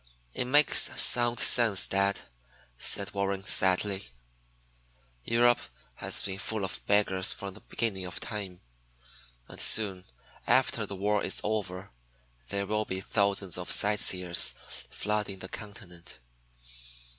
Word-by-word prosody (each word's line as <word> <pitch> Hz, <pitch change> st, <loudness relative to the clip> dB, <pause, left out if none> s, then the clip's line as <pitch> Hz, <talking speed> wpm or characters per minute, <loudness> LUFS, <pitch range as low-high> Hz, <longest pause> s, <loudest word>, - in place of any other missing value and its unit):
"It -, -, -3 dB
makes 145 Hz, +3 st, +4 dB
sound 120 Hz, -1 st, +4 dB
sense, 110 Hz, -3 st, +5 dB
dad," 100 Hz, 0 st, -1 dB, 0.5 s
said 100 Hz, +9 st, +2 dB
Warren 100 Hz, -1 st, -3 dB
sadly. 95 Hz, +1 st, +1 dB, 1.2 s
"Europe 120 Hz, -, +2 dB, 0.4 s
has -, -, +1 dB
been 95 Hz, -1 st, -2 dB
full 105 Hz, -1 st, -4 dB
of 95 Hz, -, -7 dB
beggars 95 Hz, -2 st, +1 dB
from 100 Hz, -1 st, -8 dB
the -, -, -13 dB
beginning 100 Hz, -5 st, -5 dB
of 90 Hz, -, -7 dB
time. 100 Hz, -5 st, -7 dB, 0.9 s
And -, -, -9 dB
soon, 95 Hz, -4 st, +5 dB, 0.4 s
after -, -, +1 dB
the 100 Hz, -, -6 dB
war 105 Hz, +2 st, -1 dB
is -, -, -1 dB
over, 95 Hz, -4 st, -5 dB, 0.6 s
there 100 Hz, 0 st, -2 dB
will 105 Hz, +1 st, -3 dB
be 95 Hz, -1 st, -5 dB
thousands 100 Hz, -2 st, -1 dB
of 90 Hz, -, -8 dB
sightseers 90 Hz, -4 st, +2 dB, 0.3 s
flooding 105 Hz, -1 st, -4 dB
the 95 Hz, 0 st, -9 dB
continent. 95 Hz, -5 st, -10 dB
100 Hz, 120 wpm, -27 LUFS, 95-105 Hz, 1.2 s, sense